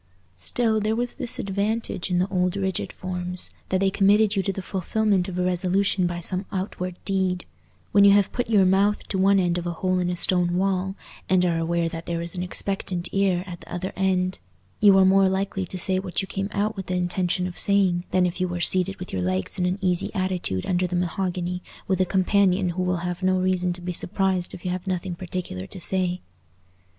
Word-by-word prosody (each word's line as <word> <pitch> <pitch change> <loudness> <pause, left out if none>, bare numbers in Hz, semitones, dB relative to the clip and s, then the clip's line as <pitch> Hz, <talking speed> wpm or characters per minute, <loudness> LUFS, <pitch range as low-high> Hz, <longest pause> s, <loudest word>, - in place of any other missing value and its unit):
Still, 220 - +1
there 215 +1 0
was 245 +1 -2
this 245 - -2
advantage 200 0 -2
in 180 - +1
the 180 +2 +2
old 180 -1 0
rigid 190 -2 -2
forms, 180 -1 -4 0.2
that 185 - +1
they 195 0 +3
committed 205 +2 +4
you 195 - +2
to 195 - -1
the 195 0 -6
fulfilment 195 0 0
of 180 - -5
a 180 - +1
resolution 185 +1 +1
by 175 0 -3
some 185 +3 -3
outward 185 -2 -3
deed: 190 -2 0 0.5
when 200 - +6
you 200 - +8
have 200 -1 +4
put 245 -2 -2
your 205 -4 +5
mouth 195 +3 +2
to 190 - -1
one 195 +1 +5
end 175 -1 +1
of 175 - -5
a 170 - -2
hole 185 +2 0
in 180 -1 0
a 180 - -1
stone 175 0 +1
wall 190 0 0 0.3
and 185 -1 +4
are 170 -2 +1
aware 170 +1 0
that 165 0 -6
there 170 -1 -1
is 170 0 -3
an 180 - -4
expectant 180 -1 -2
ear 190 -2 +1
at 175 -3 -8
the - - -14
other 180 +2 -4
end, 185 -1 0 0.4
you 200 -2 +7
are 190 - +6
more 190 0 +5
likely 190 0 -2
to 185 - -6
say 185 +1 +2
what 190 -2 -3
you 195 - -2
came 195 +1 -3
out 210 +2 -1
with 190 -2 -6
the 185 - -1
intention 180 0 0
of 180 -1 -4
saying 190 -3 +2
than 185 -1 +3
if 180 +1 -3
you 185 - +2
were 175 0 -4
seated 185 +2 +3
with 180 - -8
your 95 - -1
legs 95 - -1
in 180 - +2
an 180 +1 0
easy 180 -2 0
attitude 185 - -1
under 180 0 +1
the 180 - -3
mahogany 180 0 -2 0.3
with 190 -1 +1
a - - +4
companion 190 0 +2
who 180 +2 -2
will 180 0 0
have 180 0 -3
no 185 0 +2
reason 185 -1 +1
to 175 0 -6
be 180 +1 -3
surprised 185 +1 0
if 175 - -13
you 180 - 0
have 180 +1 -4
nothing 185 -1 -2
particular 170 - -5
to - - -8
say. 180 0 -1
185 Hz, 225 wpm, -24 LUFS, 180-195 Hz, 0.5 s, you